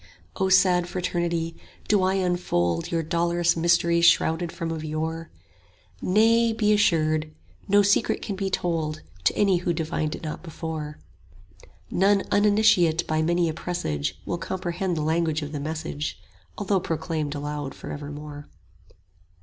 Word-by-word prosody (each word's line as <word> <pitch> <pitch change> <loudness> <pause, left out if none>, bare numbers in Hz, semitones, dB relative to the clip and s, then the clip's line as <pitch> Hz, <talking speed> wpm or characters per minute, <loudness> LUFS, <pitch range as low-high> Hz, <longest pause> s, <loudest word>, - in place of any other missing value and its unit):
35 - - -7
O 190 - +2
sad 185 -2 +4
Fraternity, 170 -2 -2 0.3
do 205 -2 +3
I 185 +1 +2
unfold 175 - 0
Your 165 -1 0
dolorous 170 +1 +1
mysteries 170 0 +2
shrouded 165 0 +3
from 165 -1 -4
of 160 -1 -4
yore? 160 +1 -3 0.7
Nay, 225 +4 +3
be 210 -1 +2
assured; 155 -6 +2 0.4
no 205 0 +5
secret 200 +3 +2
can 200 - -4
be 195 0 -2
told 160 -4 -2 0.2
To - - +2
any 195 -3 +3
who 175 0 -1
divined 155 -1 -2
it - - -11
not 155 - -5
before: 160 -3 -6 0.9
40 - - -6
None 200 0 +4
uninitiate 205 -5 +4
by 155 0 0
many 170 +1 +2
a 160 - -1
presage 80 - -3
Will 175 - -3
comprehend 180 0 -3
the 155 - -1
language 160 -1 0
of 145 - -6
the 150 - -4
message, 155 0 -4 0.4
Although 200 -1 +1
proclaimed 160 -3 -3
aloud 145 -1 -4
for - - -8
evermore. 145 0 -8
170 Hz, 150 wpm, -25 LUFS, 155-185 Hz, 0.9 s, no